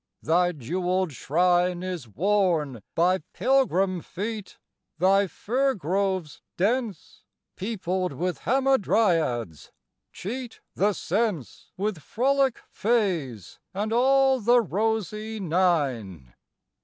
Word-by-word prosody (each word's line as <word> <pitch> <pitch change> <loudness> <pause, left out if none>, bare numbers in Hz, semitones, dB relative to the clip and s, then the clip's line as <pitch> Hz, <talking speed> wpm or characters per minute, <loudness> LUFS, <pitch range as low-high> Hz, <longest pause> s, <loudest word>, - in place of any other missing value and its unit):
Thy 175 +3 +3
jeweled 180 +5 -1
shrine 175 +5 +1
Is 180 -9 -5
worn 165 - 0
by 180 +3 +3
pilgrim 195 -9 +2
feet; 210 +3 -6 0.4
thy 195 +3 +3
firgroves 195 - -1 0.2
dense, 215 - -2 0.3
Peopled 185 -3 -2
with 175 +6 -2
Hamadryads, 190 - +1 0.4
cheat 240 +4 -6
the 205 +2 +2
sense 195 - -2
With 200 -2 -2
frolic 265 - +1
fays 180 - -1 0.2
and 215 +3 -1
all 265 +2 +4
the 240 +2 +4
rosy 220 +1 -2
Nine. 140 - 0
190 Hz, 90 wpm, -26 LUFS, 170-225 Hz, 0.4 s, all